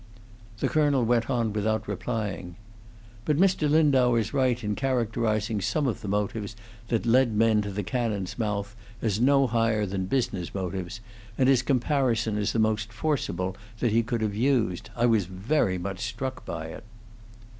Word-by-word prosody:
The -, -, 0 dB
colonel 145 Hz, -5 st, +2 dB
went 115 Hz, 0 st, +1 dB
on 115 Hz, -5 st, 0 dB
without 110 Hz, +1 st, -1 dB
replying: 100 Hz, -3 st, -4 dB, 0.7 s
"But 150 Hz, +3 st, +1 dB
Mr. 180 Hz, -4 st, +3 dB
Lindau 140 Hz, -6 st, +4 dB
is 110 Hz, -2 st, 0 dB
right 130 Hz, -3 st, +1 dB
in 105 Hz, 0 st, -1 dB
characterizing 115 Hz, -4 st, 0 dB
some 105 Hz, +10 st, 0 dB
of 125 Hz, -, -1 dB
the -, -, -6 dB
motives 105 Hz, +1 st, -2 dB, 0.3 s
that 115 Hz, -1 st, 0 dB
led 120 Hz, -1 st, +3 dB
men 110 Hz, 0 st, +4 dB
to 105 Hz, -, -4 dB
the 100 Hz, +1 st, -3 dB
cannon's 110 Hz, -4 st, -2 dB
mouth 105 Hz, -1 st, -2 dB, 0.3 s
as 110 Hz, -1 st, 0 dB
no 135 Hz, +1 st, +5 dB
higher 115 Hz, -3 st, +1 dB
than 95 Hz, -1 st, -3 dB
business 115 Hz, -9 st, -1 dB
motives, 95 Hz, +1 st, -4 dB, 0.4 s
and 130 Hz, -, +3 dB
his 135 Hz, -2 st, +5 dB
comparison 125 Hz, -4 st, +1 dB
is 105 Hz, -1 st, 0 dB
the -, -, -2 dB
most 110 Hz, 0 st, +1 dB
forcible 105 Hz, -, -2 dB, 0.2 s
that 120 Hz, -, +1 dB
he 115 Hz, +2 st, +4 dB
could 115 Hz, 0 st, -2 dB
have 105 Hz, -2 st, 0 dB
used. 115 Hz, -5 st, 0 dB
I 120 Hz, -, +2 dB
was 110 Hz, -5 st, +3 dB
very 95 Hz, -, 0 dB
much 95 Hz, +1 st, -5 dB
struck 120 Hz, +4 st, -4 dB
by 80 Hz, -1 st, -5 dB
it." 80 Hz, -, -9 dB
110 Hz, 165 wpm, -27 LUFS, 105-125 Hz, 0.7 s, no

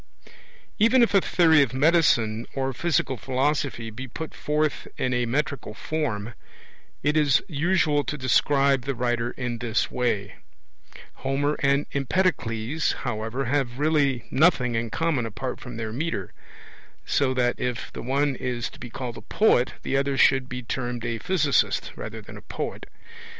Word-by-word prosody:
Even 235 Hz, +4 st, +5 dB
if 230 Hz, -, +2 dB
a 195 Hz, -, +6 dB
theory 160 Hz, -5 st, +4 dB
of 130 Hz, -2 st, 0 dB
medicine 130 Hz, -7 st, +3 dB
or 135 Hz, -1 st, -1 dB
physical 135 Hz, -3 st, 0 dB
philosophy 130 Hz, -1 st, -1 dB
be 130 Hz, +5 st, -7 dB
put 160 Hz, +6 st, -7 dB
forth 150 Hz, 0 st, -1 dB
in 125 Hz, -, 0 dB
a 125 Hz, -1 st, 0 dB
metrical 140 Hz, -3 st, -2 dB
form, 120 Hz, -7 st, -3 dB, 0.7 s
it 145 Hz, +2 st, +2 dB
is 145 Hz, -3 st, +4 dB
usual 155 Hz, -2 st, +2 dB
to 150 Hz, -, -3 dB
describe 135 Hz, +1 st, +3 dB
the 135 Hz, +2 st, -3 dB
writer 120 Hz, 0 st, 0 dB
in 125 Hz, -2 st, -3 dB
this 115 Hz, -2 st, 0 dB
way; 105 Hz, -5 st, -1 dB, 0.8 s
Homer 140 Hz, +2 st, 0 dB
and 140 Hz, +1 st, +2 dB
Empedocles, 140 Hz, -, 0 dB
however, 120 Hz, +2 st, -2 dB
have 130 Hz, -2 st, -1 dB
really 145 Hz, -5 st, +2 dB
nothing 130 Hz, -5 st, +3 dB
in 115 Hz, 0 st, -1 dB
common 150 Hz, -4 st, 0 dB
apart 125 Hz, +4 st, -5 dB
from 125 Hz, -3 st, -8 dB
their 110 Hz, -1 st, -4 dB
metre; 135 Hz, -, -3 dB, 0.7 s
so 130 Hz, -2 st, +1 dB
that, 120 Hz, -1 st, +1 dB
if 125 Hz, 0 st, -3 dB
the -, -, -6 dB
one 140 Hz, +2 st, +1 dB
is 120 Hz, -2 st, -3 dB
to -, -, -14 dB
be 120 Hz, -, -8 dB
called 120 Hz, -1 st, -6 dB
a -, -, -8 dB
poet, 170 Hz, -, +2 dB
the -, -, -1 dB
other 135 Hz, 0 st, +1 dB
should 130 Hz, -1 st, +4 dB
be 125 Hz, 0 st, -5 dB
termed 120 Hz, 0 st, -3 dB
a 115 Hz, -1 st, -2 dB
physicist 155 Hz, -, +1 dB
rather -, -, -7 dB
than -, -, -11 dB
a -, -, -10 dB
poet. -, -, -5 dB
130 Hz, 155 wpm, -25 LUFS, 120-150 Hz, 0.8 s, a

